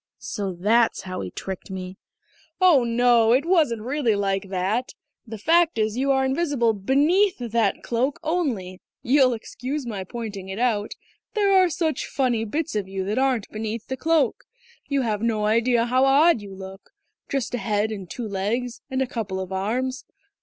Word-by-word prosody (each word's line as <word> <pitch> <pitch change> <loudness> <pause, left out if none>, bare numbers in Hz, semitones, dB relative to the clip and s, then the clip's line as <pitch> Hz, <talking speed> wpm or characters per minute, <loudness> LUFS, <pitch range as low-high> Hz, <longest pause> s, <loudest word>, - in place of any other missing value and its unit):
"So 200 -3 -4
that's 220 +6 +2
how 185 -1 -5
he 95 - -5
tricked 190 - -7
me!" 185 0 -7 0.6
"Oh 350 -9 +6
no, 235 -1 +4
it 270 +5 +2
wasn't 305 - +2
really 255 -3 +1
like 195 -1 -1
that. 195 +7 -1 0.3
The 220 0 -6
fact 330 +7 +3
is 215 0 0
you 270 +3 0
are 265 -1 +3
invisible 265 -5 +1
beneath 295 - +2
that 230 -4 0
cloak, 250 +4 -1
only 255 - -2 0.2
you'll 260 0 +4
excuse 255 +5 -5
my 205 -5 -4
pointing 200 -2 -7
it 190 - -5
out 220 -3 0 0.4
there 400 -2 +3
are 370 -2 +5
such 315 -4 -1
funny 245 -5 0
bits 310 +7 -3
of 205 -3 -1
you 190 0 -4
that 210 +5 -1
aren't 260 -5 +1
beneath 220 +1 -5
the 260 - -1
cloak. 320 +1 +1 0.4
You've 235 -7 0
no 220 -2 0
idea 230 +2 +2
how 255 +2 +2
odd 280 -1 +5
you 200 -1 -9
look; 190 0 -10 0.4
just 270 -3 -2
a 245 - -1
head 215 -1 0
and 195 -5 -7
two 235 +3 -5
legs, 220 +5 -2
and 265 0 0
a - - -1
couple 205 -6 -4
of 190 0 -5
arms.... 245 +7 -2
235 Hz, 175 wpm, -24 LUFS, 205-270 Hz, 0.6 s, Oh